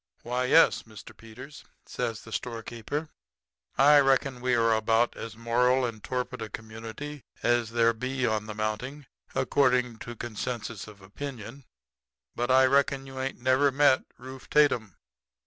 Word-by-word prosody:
"'Why, 125 +1 -1
yes, - - +5
Mr. 110 -3 -13
Peters,' 125 +6 -12 0.2
says 115 -1 -4
the 115 - -12
storekeeper. 120 +6 -4 0.7
'I 145 +2 +7
reckon 135 -2 +2
we 125 0 +1
air 115 -1 +3
about 115 +2 +2
as 110 -1 -8
moral 125 +2 +2
and 110 -3 -6
torpid 125 -2 -3
a 110 - -5
community 115 +7 -8 0.2
as 120 -2 +2
there 115 0 +3
be 130 +3 -2
on 110 -1 -1
the 105 - -6
mounting, 110 +7 -4 0.3
according 125 -4 +2
to 120 0 -8 0.2
censuses 120 -2 -4
of 105 -2 -14
opinion; 125 +3 -8 0.7
but 120 +1 -2
I 130 +1 +6
reckon 140 0 +2
you 135 -1 -8
ain't 130 -2 -5
ever 135 +2 +4
met 140 -1 +4
Rufe 130 +2 -11
Tatum.' 120 - +2
125 Hz, 145 wpm, -28 LUFS, 115-135 Hz, 0.7 s, I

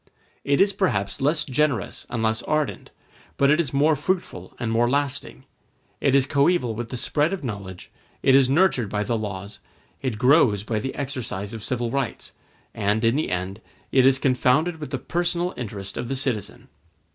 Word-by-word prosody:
It 140 0 +2
is 200 +1 +4
perhaps 105 - -1
less 150 +3 +2
generous 135 - -1
and 115 -2 -2
less 110 0 +1
ardent, 155 -2 -2 0.5
but 140 0 +4
it 155 - +3
is 150 -7 0
more 150 +3 +3
fruitful 150 - -3
and 115 -2 -2
more 120 +1 +2
lasting; 140 0 -2 0.6
it 135 - +2
is 135 -2 +4
coeval 140 -3 +2
with 115 +1 -5
the 125 - -4
spread 150 +7 +1
of 190 - -4
knowledge, 100 -6 -7 0.3
it 135 - +5
is 135 -1 +5
nurtured 140 - +3
by 105 +1 -1
the 115 +3 -1
laws, 100 -2 -5 0.4
it 125 -5 -2
grows 125 -5 +4
by 110 0 -1
the 130 +5 -4
exercise 120 -8 -4
of 110 -2 -7
civil 120 -1 -2
rights, 135 -3 -3 0.4
and, 110 +1 0
in 115 +2 +3
the 155 - 0
end, 95 +3 -3 0.3
it 130 - +5
is 135 0 +5
confounded 140 +6 +2
with 150 - -6
the 135 - -2
personal 175 +5 -1
interest 100 -5 -6
of 120 0 -3
the 135 - -2
citizen. 130 -7 -3
130 Hz, 180 wpm, -24 LUFS, 110-145 Hz, 0.6 s, it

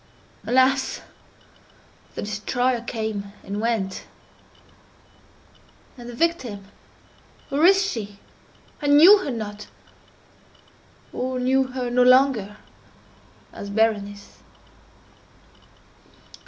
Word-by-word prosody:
Alas! 260 +1 +2 1.1
the - - -5
destroyer 235 +4 -1
came 220 -4 -5
and 205 +1 -5
went!—and 230 +3 -9
the 240 - -8
victim—where 275 - -5
is 390 0 +4
she? 210 - -5 0.6
I 290 - -2
knew 330 +9 +8
her 380 - -5
not—or 230 +3 -10
knew 265 +1 +2
her 255 -1 -5
no 250 +1 +2
longer 250 -5 +3 1.0
as 200 - -8
Berenice. 205 -1 -2
240 Hz, 75 wpm, -23 LUFS, 210-265 Hz, 1.1 s, knew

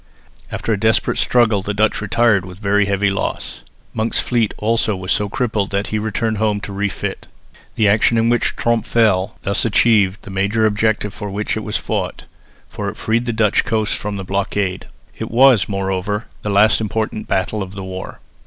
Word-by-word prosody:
After 115 - -2
a 105 - -2
desperate 110 0 +1
struggle 115 -5 +3
the 105 +1 -4
Dutch 105 0 +1
retired 110 -2 +2
with 90 -1 -10
very 105 0 +2
heavy 100 0 +1
loss. 100 - -4 0.3
Monk's 110 +1 0
fleet 115 -4 +1
also 110 -1 +1
was 95 0 -5
so 105 -1 +1
crippled 110 -4 -1
that 100 +1 -1
he 110 - +1
returned 110 +1 -1
home 105 -2 +1
to 100 - -7
refit. 100 0 -3 0.5
The 110 - +3
action 110 +3 +3
in 115 0 +2
which 120 0 +1
Tromp 115 -1 0
fell 105 -3 +2
thus 100 - 0
achieved 105 -3 +3
the 100 - -9
main 100 +3 -1
object 110 0 +1
for 105 - -6
which 105 +2 -2
it - - -2
was 105 0 -1
fought, - - -3 0.4
for - - -4
it - - -9
freed 115 +2 0
the - - +1
Dutch 110 -2 +2
coast 110 -2 0
from 105 -1 -4
blockade. 95 0 -2 0.3
It - - -4
was, 120 -5 +5
moreover, 95 +2 -2 0.2
the 105 - -3
last 105 +2 +4
important 110 0 -3
battle 100 +3 -1
in 95 - -8
the 95 0 -8
war. 95 0 -7
105 Hz, 185 wpm, -19 LUFS, 100-110 Hz, 0.5 s, was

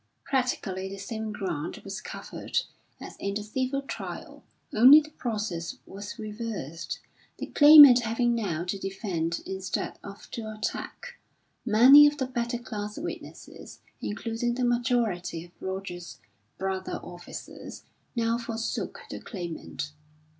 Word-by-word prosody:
Practically 215 -8 -1
the 195 - -7
same 220 +2 -4
ground 175 -7 -4
was 195 +1 -6
covered - - -3 0.4
as - - -9
in 200 0 -3
the 210 - -2
civil 260 +5 -2
trial, - - -7 0.3
only 255 +7 +9
the 305 0 -8
process 210 - -3
was 205 +3 -8
reversed: 210 - -5 0.4
the - - -4
Claimant 290 -4 +10
having 235 +1 +1
now 190 -8 -1
to 185 +2 -3
defend 190 -4 -2
instead 190 -1 -3
of 200 0 -10
to 220 -2 -5
attack. 215 0 -5 0.5
Many 260 +7 +9
of 295 0 0
the 265 - 0
better 240 -1 -2
class 210 -3 -6
witnesses, - - -8 0.2
including 230 +2 -2
the 250 0 0
majority 230 -9 0
of 175 - -19
Roger's 190 -2 -6 0.4
brother 190 0 -3
officers, 175 0 -9 0.3
now 230 0 +1
forsook 230 -1 -4
the - - -5
Claimant. 170 -5 -6
215 Hz, 125 wpm, -28 LUFS, 190-240 Hz, 0.5 s, Claimant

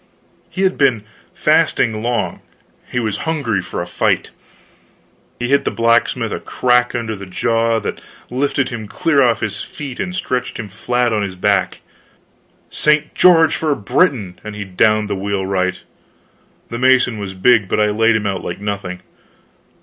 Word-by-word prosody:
He 190 - -3
had 190 -1 +1
been 125 -7 +3 0.3
fasting 110 -1 +2
long, 115 -6 -1 0.5
he 125 - 0
was 110 -4 -2
hungry 120 - 0
for 90 - -5
a - - -7
fight. 90 - 0 1.1
He 120 - -3
hit 140 +1 +3
the - - 0
blacksmith 115 0 +1
a - - -3
crack 125 -1 +1
under 115 -2 -3
the 100 -1 -9
jaw 115 +4 +1
that - - -5 0.3
lifted 140 +1 0
him 110 -3 -6
clear 145 +5 +1
off 120 -3 +2
his 100 -2 -3
feet 140 -4 -8
and 180 - -3
stretched 125 -8 -2
him 110 -3 -6
flat 120 +4 0
on 105 - +1
his 100 -2 -4
back. 95 0 0 0.9
"St. 150 0 +1
George 165 -3 +5
for 155 -3 0
Britain!" 115 - 0
and 105 -1 -7
he 105 - -4
downed 105 +3 +2
the 100 - -2
wheelwright. 95 -1 -1 0.9
The 115 - -5
mason 125 -3 +3
was 95 -2 -6
big, 100 0 +3
but - - 0
I 105 0 +3
laid 115 +2 +3
him 110 -1 -1
out 95 -2 -2
like 85 - -5
nothing. 100 -3 -4
115 Hz, 165 wpm, -18 LUFS, 100-125 Hz, 1.1 s, George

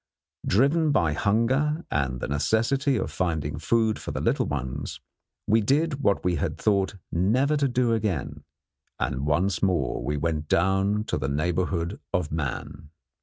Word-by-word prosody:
Driven 145 - +3
by 85 - +2
hunger 130 - +1
and 65 -3 -1
the - - -2
necessity 115 - +1
of 85 - -2
finding 75 -4 -2
food 110 +5 +1
for - - -7
the - - -3
little - - +1
ones 70 0 -4 0.5
we 110 +2 +3
did 140 +5 +1
what 100 -8 +1
we 90 -2 +2
had - - -2
thought 100 -2 +1 0.2
never 125 - +2
to 140 -1 +2
do 125 -2 +1
again, 100 - -2 0.6
and 65 +3 -2
once 90 +6 +1
more 85 -11 0 0.2
went 75 0 -2
down 95 +5 +2
to 110 - -2
the 65 0 -2
neighbourhood 85 - -1
of 90 -4 0
man. 75 0 -4
95 Hz, 150 wpm, -26 LUFS, 75-115 Hz, 0.6 s, Driven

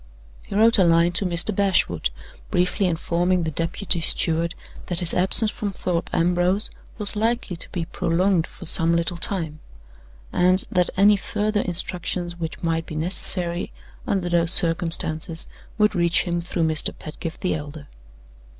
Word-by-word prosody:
He - - -9
wrote 225 +1 +4
a - - +6
line 170 0 +3
to 180 +2 +1
Mr. 175 +4 +2
Bashwood, 190 - +1 0.4
briefly 180 +2 +1
informing 175 +1 0
the 160 - -2
deputy 170 +3 0
steward 165 +1 0 0.3
that 175 -1 -3
his 175 -2 +3
absence 200 +4 +4
from 205 -2 -5
Thorpe 175 -2 -3
Ambrose 180 +4 0 0.3
was 210 -1 +4
likely 225 -3 -1
to - - -4
be 175 -3 -4
prolonged 175 0 0
for - - -12
some 165 +1 +4
little 170 +1 -1
time, 165 -4 -4 0.7
and 185 +1 +3
that 180 -1 +1
any 205 +1 +5
further 210 +1 -1
instructions 175 0 -1
which 165 0 -6
might 165 -1 -1
be 155 - -7
necessary, 175 +1 0 0.4
under 190 -3 -1
those 170 -1 +2
circumstances, 165 -1 0 0.3
would 210 -1 +3
reach 170 -1 +2
him 175 -1 -2
through 170 0 -3
Mr. 155 -1 +2
Pedgift 160 +2 -8
the 185 - 0
elder. 145 -1 -7
175 Hz, 150 wpm, -22 LUFS, 165-190 Hz, 0.7 s, a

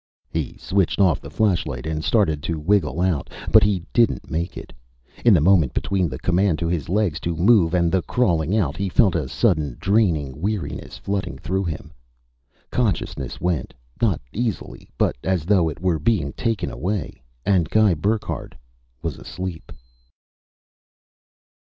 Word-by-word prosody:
He - - -3
switched 95 -1 0
off 95 -5 +3
the - - -9
flashlight 85 - 0
and 80 -1 -3
started 80 -10 +2
to 80 +2 -2
wriggle 85 0 +1
out. 90 -6 0 0.2
But - - +8
he 95 -4 +1
didn't 120 -2 +2
make 85 +2 -2
it. - - -9 0.5
In 120 - +6
the 95 - +6
moment 85 -6 +4
between 95 -4 0
the 65 - -5
command 90 +2 +1
to 85 - -2
his 85 -4 -2
legs 95 -4 +1
to 85 -1 -2
move 90 -1 +4
and 85 -2 +2
the 95 - +2
crawling 90 -6 +1
out, 80 -7 0
he 100 -1 -1
felt 100 -1 +4
a 75 -6 -2
sudden 75 - +1
draining 80 - +1
weariness 105 -1 -3
flooding 100 -1 -3
through 95 +1 -2
him. 80 -1 -5 0.8
Consciousness 95 - -1
went 85 -7 -2 0.3
not 105 -9 +2
easily, 115 -3 -4
but - - +2
as 95 -4 0
though 90 -4 +3
it 75 - -8
were 90 -2 0
being 75 -5 0
taken 115 -4 -2
away, 95 -2 -3 0.2
and 90 -5 +2
Guy 110 -3 +4
Burckhardt 105 - -2 0.5
was 80 -5 -3
asleep. 90 -3 -7
90 Hz, 155 wpm, -22 LUFS, 80-100 Hz, 0.8 s, But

